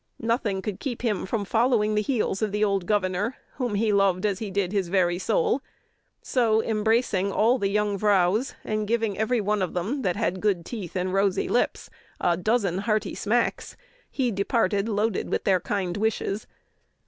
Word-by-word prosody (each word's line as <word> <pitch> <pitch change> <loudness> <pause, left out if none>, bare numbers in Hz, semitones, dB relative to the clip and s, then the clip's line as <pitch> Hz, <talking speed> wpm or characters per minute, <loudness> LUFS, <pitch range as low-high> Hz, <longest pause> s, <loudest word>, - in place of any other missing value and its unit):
"Nothing 225 -5 0
could 205 -3 -4
keep 250 -4 -4
him 210 -6 -1
from 205 0 -2
following 225 0 +2
the 210 - +2
heels 215 -4 -1
of 215 -2 0
the 210 +1 0
old 195 -4 0
governor, 205 +3 0 0.2
whom 245 -6 -1
he 215 +1 +1
loved 195 -1 +2
as 200 -3 0
he 215 - -4
did 190 -1 -1
his 200 -3 0
very 175 -2 +2
soul; 220 +6 +1 0.6
so, 225 -4 +2
embracing 215 -3 +1
all 235 +6 +3
the 195 - 0
young 205 -1 0
vrouws, 205 +4 +2
and 215 -1 -2
giving 225 -2 0
every 220 +4 +1
one 210 0 0
of 185 - -2
them 215 +11 -2
that 180 -7 0
had 185 +1 -1
good 190 -5 +1
teeth 200 -8 -6
and 185 0 -1
rosy 195 -1 +1
lips 245 - -1 0.3
a 175 - +2
dozen 195 -1 0
hearty 215 0 0
smacks, 235 +3 -1 0.3
he 255 -4 0
departed, 205 +1 0
loaded 210 -1 0
with - - -1
their 190 -2 +3
kind 185 -1 -2
wishes." 210 -1 -1
210 Hz, 180 wpm, -25 LUFS, 190-225 Hz, 0.6 s, all